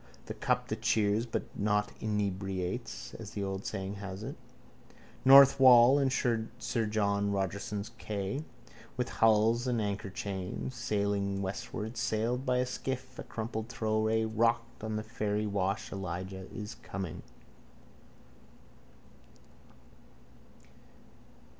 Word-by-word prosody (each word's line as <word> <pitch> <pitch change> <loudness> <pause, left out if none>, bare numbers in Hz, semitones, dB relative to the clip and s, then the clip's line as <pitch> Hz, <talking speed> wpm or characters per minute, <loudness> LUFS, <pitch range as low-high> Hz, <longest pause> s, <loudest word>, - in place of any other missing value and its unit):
The - - -5
cup - - 0
that - - -3
cheers 110 +2 +2
but - - -2
not 105 0 +1
inebriates, 100 +1 -2
as 110 -3 -7
the 100 - -4
old 95 0 -3
saying 95 +1 -4
has 100 0 -6
it. - - -5 0.9
North 135 +1 +9
wall 130 +1 +8
and 135 -2 +2
sir 115 -4 +1 0.4
John 100 -1 +1
Rogerson's 100 +2 -2
quay, 100 +7 -3 0.5
with 125 - -1
hulls 115 +2 +3
and 120 -2 +1
anchorchains, 100 +1 -3
sailing 100 -4 -1
westward, 110 +3 -4
sailed 115 +4 -1
by 125 0 +3
a 125 - +2
skiff, 130 0 -5
a - - -4
crumpled 110 0 -4
throwaway, 110 0 +1
rocked 115 +1 0
on 110 0 -2
the 110 - -2
ferrywash, 105 -2 -1
Elijah 95 0 -5
is 105 0 -6
coming. 95 -5 -5
110 Hz, 110 wpm, -31 LUFS, 100-115 Hz, 0.9 s, North